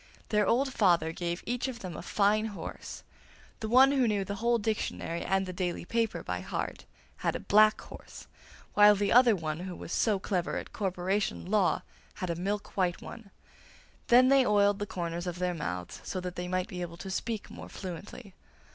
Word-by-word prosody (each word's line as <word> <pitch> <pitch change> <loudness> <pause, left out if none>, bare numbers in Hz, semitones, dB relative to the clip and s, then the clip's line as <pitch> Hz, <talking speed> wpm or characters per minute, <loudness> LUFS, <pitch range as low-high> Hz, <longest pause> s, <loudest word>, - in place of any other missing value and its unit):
Their 210 -1 +2
old 265 +3 +2
father 175 -5 +3
gave 170 +1 -4
each 245 +2 -1
of 250 -3 -6
them 180 -3 -6
a - - -6
fine 210 +1 +2
horse; 210 -3 -7 0.6
the 220 - -4
one 260 +3 +7
who 265 -4 +3
knew 205 -3 0
the 230 +5 +1
dictionary 210 -5 -2
and 195 0 +1
the 185 - -6
daily 180 -1 -3
paper 225 -5 -1
by 90 0 -3
heart 90 - -5 0.3
had - - -1
a - - -2
black 215 +1 +5
horse, - - -11 0.5
while 210 0 +7
the 200 0 0
other 240 -2 +6
who 165 +3 -4
was - - -7
so 215 -3 +2
clever 185 -2 -2
at - - -7
corporation 190 0 -1
law 195 -1 +2 0.3
had 180 -2 -3
a - - -2
milk 200 +4 -3
white 180 -3 +1
one. 225 -4 -10 0.8
Then 250 +2 +6
they 275 -1 +6
oiled 205 -2 +3
the 205 - -3
corners 175 -1 -4
of 175 -1 -4
their 180 0 -1
mouths 90 - -5
so 185 - -4
that 180 -1 -5
they 180 0 -4
might 185 0 -1
be 180 -4 -6
able 170 -1 -6
to 190 +2 -7
speak 220 +2 -3
more - - -9
fluently. 195 +3 -8
195 Hz, 190 wpm, -30 LUFS, 180-215 Hz, 0.8 s, one